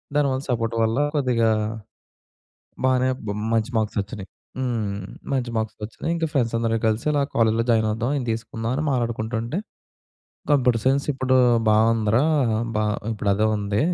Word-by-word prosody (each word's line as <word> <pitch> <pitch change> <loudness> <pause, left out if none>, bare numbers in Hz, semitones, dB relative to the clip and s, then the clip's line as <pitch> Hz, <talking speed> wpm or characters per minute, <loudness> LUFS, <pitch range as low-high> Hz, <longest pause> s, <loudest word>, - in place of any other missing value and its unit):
దానివల్ల 135 -2 +2
సపోర్ట్ 115 -1 -1
వల్ల 115 +5 +1 0.2
కొద్దిగా 120 -5 +2 1.4
బానే 130 0 +3 0.2
బ - - -5 0.3
మంచి 115 +2 +1
మార్క్‌‌సొచ్చినాయి 105 -1 -3 0.3
హ్మ్. 110 -6 -2 0.3
మంచి 125 -3 0
మార్క్‌‌సొచ్చినాయి. 110 +8 -3
ఇంకా 165 -1 -1
ఫ్రెండ్స్ 120 -4 +1
అందరు 115 -1 0
కలిసి 110 +5 -1
అలా 145 -1 +2
కాలేజ్‌లో 115 0 +3
జాయిన్ 110 -1 +2
అవుదాం 120 +5 -1
ఇది 125 - -4
తీసుకుందాం 115 0 -4
అని 155 - -1
మాటాడుకుంటుంటే 115 - -2 0.9
కంప్యూటర్ 125 -5 +3
సైన్స్ 135 +1 +2
ఇప్పుడు 130 0 +1 0.4
బావుందిరా! 110 +3 +3 0.5
బా 110 - +1 0.3
ఇప్పుడు 105 -1 -3
అదే 110 +2 +2
ఉంది. 100 +1 -1
115 Hz, 135 wpm, -23 LUFS, 110-130 Hz, 1.4 s, బానే